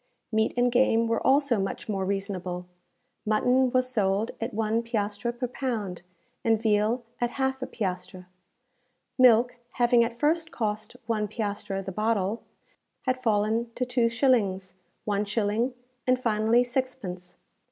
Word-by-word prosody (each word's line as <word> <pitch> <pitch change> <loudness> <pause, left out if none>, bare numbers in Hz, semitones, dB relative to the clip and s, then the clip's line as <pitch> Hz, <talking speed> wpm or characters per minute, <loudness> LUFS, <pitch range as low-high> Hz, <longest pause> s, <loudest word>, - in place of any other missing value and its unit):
Meat 220 0 +2
and 245 0 +3
game 235 -2 +3
were 230 0 0
also 275 -4 +3
much 195 +4 -3
more 195 -3 -1
reasonable. 185 -2 -3 0.6
Mutton 250 +4 +3
was 255 0 +2
sold 200 +1 +1
at 230 +3 -2
one 220 +1 0
piastre 215 -1 -2
per 245 +1 -3
pound, 225 -8 -3 0.4
and 225 -1 +3
veal 220 +2 +1 0.2
at 240 - +1
half 265 +1 -1
a 260 - -3
piastre. 185 -2 -4 0.9
Milk, 245 0 +5 0.2
having 240 -1 +4
at 235 0 -3
first 320 +4 +1
cost 215 0 -3
one 215 -2 0
piastre 205 -2 -3
the 195 - -4
bottle, 215 +1 0 0.6
had 255 -1 -1
fallen 220 0 +1
to 250 - -1
two 245 -1 +2
shillings, 220 -7 +1 0.3
one 205 -1 0
shilling, 215 +4 0 0.3
and, 255 0 +3
finally, 225 0 +3
sixpence. 240 -9 -4
225 Hz, 140 wpm, -27 LUFS, 205-245 Hz, 0.9 s, Milk